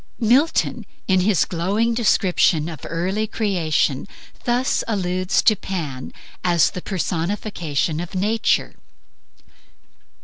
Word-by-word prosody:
Milton 255 +8 +2 0.2
in 185 -1 +3
his 185 -3 +3
glowing 200 +7 0
description 185 -8 +2
of 160 -5 -8
the - - -8
early 190 +6 -1
creation, 170 - 0 0.4
thus 245 +2 +1
alludes 185 -3 0
to 215 - +5
Pan 155 -10 -5 0.3
as 175 -3 +3
the 180 - -6
personification 170 -4 -2
of 175 +2 -6
Nature 215 +4 +1
185 Hz, 105 wpm, -21 LUFS, 165-215 Hz, 0.4 s, to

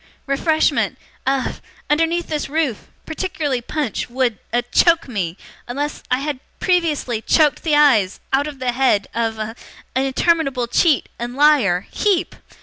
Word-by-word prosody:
Refreshment 310 +3 +1 0.3
a 270 -1 0 0.3
underneath 330 +3 +1
this 300 -3 -3
roof 295 -7 -1 0.2
particularly 310 -6 -2
punch 280 -2 -3
would 245 -3 0
a 240 +1 +1
choke 330 +7 +3
me 190 -8 -3 0.3
unless 285 +4 -3
I 255 +1 +1
had 290 -2 -3 0.2
previously 310 -10 0
choked 300 +4 +3
the 310 -3 +1
eyes 245 -11 +4
out 280 +2 +2
of 295 -2 -7
the 255 -1 -1
head 240 -5 +2
a - - -3
of 220 0 -4 0.4
interminable 270 0 +1
cheat, 285 +5 +2
and 240 +1 -4
liar 265 -12 +4
HEEP! 400 -5 +1
275 Hz, 140 wpm, -20 LUFS, 240-310 Hz, 0.4 s, eyes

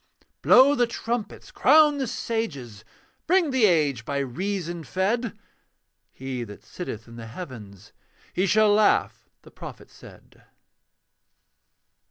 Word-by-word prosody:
Blow 265 +3 +6
the 245 -4 +2
trumpets, 235 -2 -5
crown 300 -2 +5
the 265 - -1
sages, 150 - -4 0.4
Bring 350 -3 +3
the 260 -4 +3
age 145 - +1
by 140 +4 -3
reason 175 +5 -3
fed! 210 +7 -2 0.7
(He 130 -2 -5
that 105 -3 -11
sitteth 120 - -8
in 115 0 -12
the 115 -1 -8
heavens, 110 - -10 0.4
'He 190 +2 +1
shall 215 +2 +4
laugh' 210 0 +1
the - - -16
prophet - - -11
said.) - - -17
185 Hz, 120 wpm, -25 LUFS, -, 0.7 s, Blow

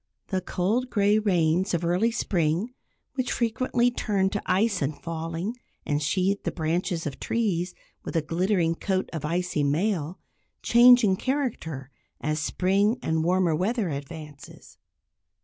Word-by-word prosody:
The 190 -2 0
cold 215 +8 -1
gray 205 -1 +3
rains 180 -2 +2
of 170 0 -2
early 180 +7 +2
spring, 190 -1 0 0.4
which 255 -2 -2
frequently 240 +1 +1
turn 195 -5 0
to 205 - -2
ice 195 +1 +2
in 140 +2 0
falling, 165 +7 -4 0.3
and 145 0 0
sheathe 185 +6 +1
the - - -2
branches 170 +1 -1
of 140 -3 -5
trees 190 -6 -1 0.3
with - - -6
a 165 - +2
glittering 170 +1 +1
coat 190 +2 -2
of 160 -3 -4
icy 175 -1 -1
mail, 165 +3 0 0.5
change 245 +1 +7
in 190 -3 +3
character 200 - -3 0.3
as 155 +1 -1
spring 195 +8 +1
and 160 - 0
the - - +1
warmer 175 -1 +2
weather 200 +3 0
advances. 145 0 -9
180 Hz, 145 wpm, -26 LUFS, 160-210 Hz, 0.5 s, change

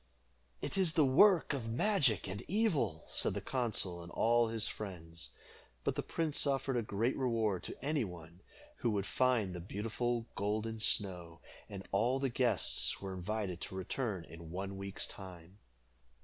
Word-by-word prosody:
"It - - 0
is 175 -4 +4
the 155 -4 +5
work 170 +6 +6
of 120 -5 -3
magic 130 - +2
and 95 +1 -4
evil," 175 - +1
said - - +2
the - - 0
consul 100 -6 0
and 85 0 -10
all 120 0 +4
his 115 0 0
friends; 85 -5 -6 0.5
but - - +1
the - - -1
prince 155 -3 0
offered 135 -1 +1
a 120 - +2
great 110 +3 0
reward 115 -7 +1
to - - -7
any 150 -2 +1
one 85 -2 -9 0.4
who 120 - 0
would 100 -3 0
find 120 -8 +2
the 90 - -5
beautiful 115 +5 -2
Golden 110 +2 -1
Snow, 90 -6 0 0.3
and 100 -2 -7
all 120 +7 +2
the 135 -1 +1
guests 120 -4 +1
were 95 -1 -5
invited 95 -1 -3
to - - -6
return 95 -1 -2
in 80 0 -10
one 95 +3 -4
week's 100 0 -1
time. 95 0 -10
110 Hz, 165 wpm, -35 LUFS, 95-125 Hz, 0.5 s, work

